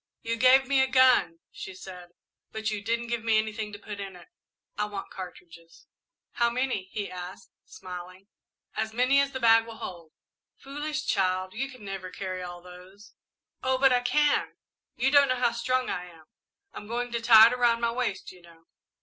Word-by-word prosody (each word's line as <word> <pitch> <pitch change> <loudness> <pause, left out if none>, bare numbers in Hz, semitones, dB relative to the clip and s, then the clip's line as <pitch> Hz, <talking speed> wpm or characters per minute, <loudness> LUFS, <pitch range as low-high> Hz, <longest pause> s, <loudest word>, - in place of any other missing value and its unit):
"You 230 0 -1
gave 255 +3 +5
me 275 -1 +3
a 265 - +3
gun," 255 -11 +4
she 190 - -9
said, 180 -2 -11 0.4
"but 220 0 -3
you 210 -1 -3
didn't 230 +2 -1
give 235 -1 -3
me 225 -1 +3
anything 215 0 -2
to 205 - -8
put 205 0 -9
in 195 -2 -7
it. 180 - -15 0.5
I 210 - -1
want 205 -2 -7
cartridges." 170 -3 -11 0.5
"How 235 -1 +1
many?" 245 -5 -2
he 200 +1 -5
asked, 180 +1 -9
smiling. 185 +1 -10 0.5
"As 220 0 -2
many 255 +3 +4
as 280 - 0
the 260 - -5
bag 225 -1 +5
will 225 -1 -9
hold." 170 -7 -9 0.4
"Foolish 295 +2 -5
child, 185 -1 0
you 270 +5 -3
never 195 -4 -7
can - - -14
carry 185 -1 -4
all 175 -1 -8
those." 180 +3 -14 0.5
"Oh, 260 0 +1
but 265 0 +4
I 250 - +4
can 290 +4 +1 0.4
you 260 +3 +1
don't 285 -2 +6
know 255 - +2
how 245 -1 +1
strong 255 +2 -1
I 180 0 -4
am! 165 -3 -17 0.5
I'm 210 - -9
going 240 +2 -3
to 235 -1 -2
tie 225 -1 +9
it - - -3
around 240 -2 +2
my 235 0 0
waist, 235 -5 -3
you 180 - -17
know." 165 -1 -19
220 Hz, 190 wpm, -27 LUFS, 185-250 Hz, 0.5 s, tie